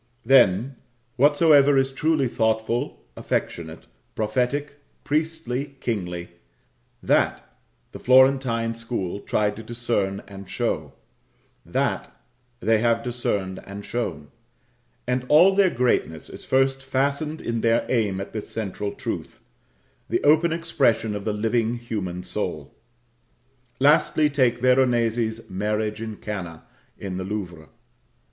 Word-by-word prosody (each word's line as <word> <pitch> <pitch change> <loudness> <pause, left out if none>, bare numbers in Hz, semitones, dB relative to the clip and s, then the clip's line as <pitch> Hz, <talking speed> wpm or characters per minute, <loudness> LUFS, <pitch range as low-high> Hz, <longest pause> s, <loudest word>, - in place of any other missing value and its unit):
then 125 0 +4 0.4
whatsoever 145 0 +5
is 135 0 +2
truly 150 0 +1
thoughtful, 110 +3 -1
affectionate, 80 -2 -3 0.3
prophetic, 130 +7 -1 0.2
priestly, 150 -3 -2
kingly 90 -8 -3 0.7
that - - +1 0.4
the - - -9
Florentine 130 -3 +4
school 115 -5 -4
tried 105 0 0
to 110 - -8
discern, 115 -4 -2
and 100 -1 -11
show; - - -2 0.7
that - - -1 0.5
they 110 0 +3
have 115 0 +1
discerned 100 -6 -2
and 100 +1 -8
shown; 80 -12 -4 0.8
and 125 +1 0
all 175 +6 +7
their 195 -1 +4
greatness 120 - 0
is - - -11
first 135 0 +2
fastened 140 +4 -1
in 115 -1 -3
their 115 0 +2
aim 105 -6 0
at 100 - -7
this 110 -2 -5
central 105 -1 -4
truth - - -5 0.7
the - - 0
open 155 +3 +4
expression 135 -10 +1
of 100 - -6
the 110 - 0
living 115 +2 0
human 100 -7 -4
soul. 90 -6 -4 1.1
Lastly, 150 +1 +4
take 125 -4 +2
Veronese's 120 -3 +2
"Marriage 105 +2 -2
in 110 -1 -5
Cana" 95 -7 -6 0.3
in 95 -2 -5
the 95 - -3
Louvre. 90 -6 -6
115 Hz, 115 wpm, -24 LUFS, 105-135 Hz, 1.1 s, all